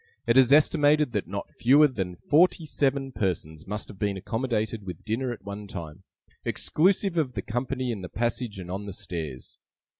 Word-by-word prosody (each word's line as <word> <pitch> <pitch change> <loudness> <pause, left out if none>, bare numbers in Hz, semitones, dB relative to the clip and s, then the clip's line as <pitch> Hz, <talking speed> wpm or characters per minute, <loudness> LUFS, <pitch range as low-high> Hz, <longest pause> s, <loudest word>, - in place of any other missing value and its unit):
It 115 - +3
is 130 -1 +6
estimated 150 -1 +5
that 105 -4 -2
not 100 +2 -5
fewer 145 +5 +6
than 95 -9 -4
forty 160 - +3
seven 135 -2 0
persons 85 -7 -3
must 105 +1 -4
have 95 - -12
been 100 -1 0
accommodated 110 0 -2
with 90 -2 -8
dinner 120 +4 -1
at 120 - -8
one 100 +1 -7
time, 85 -2 -8 0.4
exclusive 185 +1 +1
of 135 -5 -1
the 100 -4 -4
company 125 +2 -2
in 105 -4 -4
the 90 - -7
passage 120 -2 -2
and 90 -1 -7
on 100 +2 -4
the 100 - -5
stairs. 80 -9 -6
115 Hz, 180 wpm, -27 LUFS, 95-135 Hz, 0.4 s, is